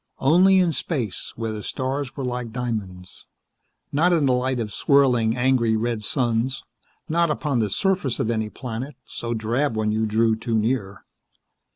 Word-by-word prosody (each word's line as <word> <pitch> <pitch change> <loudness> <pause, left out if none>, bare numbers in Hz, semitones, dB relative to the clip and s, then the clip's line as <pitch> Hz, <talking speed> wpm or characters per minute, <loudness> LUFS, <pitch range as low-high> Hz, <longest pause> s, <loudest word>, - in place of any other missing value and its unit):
Only 180 +7 +5
in 180 -2 +3
space, 130 - -2
where 115 -1 -3
the 105 -1 -5
stars 130 +3 -3
were 135 - -3
like 125 -2 -3
diamonds. 105 -7 -5 0.6
Not 165 +5 +3
in 165 -4 +3
the 130 - +3
light 125 0 0
of 105 -3 -4
swirling, 125 -5 +3
angry, 120 -3 +2
red 115 0 -1
suns, 120 +2 0 0.4
not 170 +1 +2
upon 150 -4 0
the 110 -2 +1
surface 180 - 0
of 115 - 0
any 110 -2 -1
planet, 125 +4 -6
so 120 0 -4
drab 115 +3 -1
when 105 -1 +1
you 110 +1 0
drew 110 +1 +2
too 115 +1 -3
near. 110 -3 -1
120 Hz, 165 wpm, -23 LUFS, 110-140 Hz, 0.6 s, Only